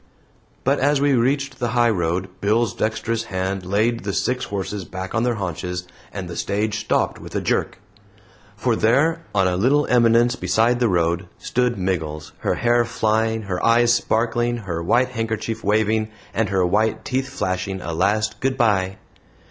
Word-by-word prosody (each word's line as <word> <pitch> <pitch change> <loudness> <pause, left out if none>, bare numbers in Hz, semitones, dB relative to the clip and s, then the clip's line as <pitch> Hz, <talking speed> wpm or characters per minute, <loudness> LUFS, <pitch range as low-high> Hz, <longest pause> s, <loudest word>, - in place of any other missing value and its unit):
But - - +2
as 145 +1 +3
we 140 0 +3
reached 135 +2 0
the 120 -1 -1
highroad, 95 -6 +1
Bill's 110 +3 +2
dexterous 115 +1 -2
hand 95 -1 -3
laid 110 +5 +1
the 100 0 -3
six 125 +5 0
horses 100 0 -4
back 95 +1 -7
on 115 - +1
their 120 0 +1
haunches, 90 -2 -4 0.3
and - - -5
the - - -7
stage 105 +1 -1
stopped - - 0
with - - -10
a - - +2
jerk. - - -1 0.8
For - - 0
there, 140 +9 +2
on 95 -2 +3
a 90 - 0
little 135 +10 +3
eminence 120 0 +4
beside 120 0 +2
the 120 -2 +2
road, 85 0 +1
stood 125 -1 0
Miggles, 80 -5 -3
her - - 0
hair 120 0 +3
flying, 110 -1 0
her 90 -3 -3
eyes 120 +1 +5
sparkling, 120 +1 0
her 85 -3 -3
white 120 +9 +2
handkerchief 115 -1 -3
waving, 110 +1 +1 0.2
and 115 -1 0
her 95 -2 +2
white 105 +4 +1
teeth 130 0 -1
flashing 95 +1 -2
a 85 -2 -5
last 105 +5 0
"good 130 0 0
by." 95 -6 +1
110 Hz, 165 wpm, -22 LUFS, 95-120 Hz, 0.8 s, eyes